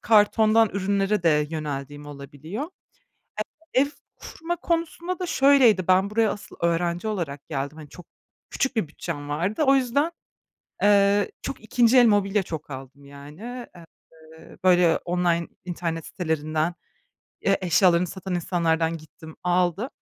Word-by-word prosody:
kartondan 220 +1 +4
ürünlere 200 0 0
de 150 -3 +3
yöneldiğim 145 -2 -5
olabiliyor. 145 - -7 1.1
Ev 265 +2 +4 0.3
kurma 340 +2 -5
konusunda 340 +1 -2
da 365 - -3
şöyleydi, 265 - +4
ben 190 +2 +4
buraya 220 -1 +2
asıl 205 - -8
öğrenci 170 +3 0
olarak 160 -9 -4
geldim. 140 +1 -4
Hani, 150 -2 -10
çok 175 +3 -13 0.4
küçük 265 -3 -1
bir 195 -8 0
bütçem 145 -2 -6
vardı. 175 - -1
O 270 - +6
yüzden, 270 +5 +1 0.7
eee, 200 0 +4
çok 270 - -6
2'nci 235 +3 +3
el 245 - +8
mobilya 205 -2 +2
çok 160 -3 -7
aldım 135 +1 -10
yani. 155 - -9
Eee, 160 -1 -17
böyle, 180 -3 +5
online 175 -1 0 0.2
internet 165 -2 -4
sitelerinden, 160 -1 -2 0.7
Ya, 195 - +2
eşyalarını 180 -1 +3
satan 190 +1 -5
insanlardan 165 -2 0
gittim, 160 0 -13
aldım. 180 +5 +1
180 Hz, 130 wpm, -24 LUFS, 160-215 Hz, 1.1 s, el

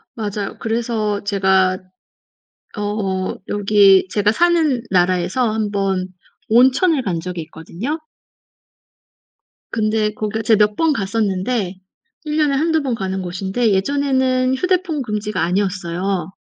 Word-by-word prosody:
맞아요. 205 -2 -4
그래서 225 -2 -1
제가 190 -2 +2 1.0
어 205 -3 -2
여기 200 -2 +4
제가 210 0 +2
사는 320 -4 +2
나라에서 185 +6 +1
1 215 -1 -1
번 195 -2 -1 0.4
온천을 260 +7 +4
간 180 -7 -2
적이 180 0 -5
있거든요. 170 - -6 1.7
근데 215 -1 0
거기가 215 +1 -3
제가 215 -1 +4
몇 210 - -19
번 325 +2 +2
갔었는데 195 -2 -1 0.5
1 300 0 -2
년에 295 -3 +2
1-2 320 +2 +1
번 255 -4 -1
가는 190 -3 -3
곳인데 190 +6 -1
예전에는 260 +3 +1
휴대폰 360 -1 0
금지가 210 -3 -3
아니었어요. 185 -1 -1
210 Hz, 240 characters per minute, -19 LUFS, 190-255 Hz, 1.7 s, 여기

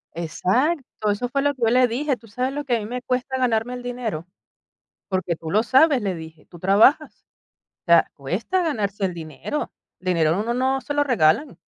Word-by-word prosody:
Exacto. 215 - -1
Eso 225 +5 -2
fue 275 +3 -1
lo 285 0 +1
que 250 - -19
yo 225 - +4
le 250 +1 +4
dije: 265 +3 -1
"¿Tú 225 0 -18
sabes 250 +5 -2
lo 290 +1 -3
que 245 - +1
a - - -3
mí 210 - -6
me 245 +3 -5
cuesta 260 +1 -2
ganarme 245 -1 0
el 245 0 -7
dinero? 235 -9 -4 0.8
Porque 185 -3 -1
tú 160 0 -7
lo 215 +3 +3
sabes", 270 +1 +4
le 195 -3 -2
dije: 160 -1 -11
"Tú 175 - -14
trabajas". 210 - +3 0.6
O - - -75
sea, 170 -1 +5
cuesta 190 - -2
ganarse 205 - -2
el 180 - -5
dinero. 165 - -5 0.3
El 185 - -17
dinero, 165 -3 +2
a - - -2
uno 230 +2 -1
no 265 +1 +1
se 290 - -4
lo 290 - +3
regalan. 245 - +2
230 Hz, 210 wpm, -23 LUFS, 185-260 Hz, 0.8 s, sea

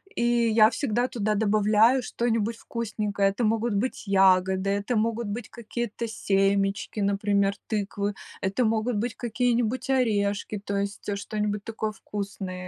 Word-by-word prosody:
и - - 0 0.3
я 215 0 +6
всегда 245 -1 0
туда 215 -3 -1
добавляю 215 +4 +4
что-нибудь 230 -2 -1
вкусненькое. 210 -3 -1
Это 215 +5 -3
могут 225 0 +1
быть 225 +2 -2
ягоды, 190 0 +3
это 205 +4 -1
могут 225 +1 0
быть 210 +2 -5
какие-то 235 0 -4
семечки, 195 -1 0
например, 200 0 +1
тыквы. 205 -1 -2 0.3
Это 200 +6 0
могут 220 +1 0
быть 230 +2 -2
какие-нибудь 240 +1 0
орешки, 210 -5 +1
то 200 0 -3
есть, 200 +1 -4
э, 200 - 0
что-нибудь 210 0 -3
такое 220 -1 -3
вкусное 195 -3 -6
210 Hz, 135 wpm, -26 LUFS, 200-230 Hz, 0.3 s, я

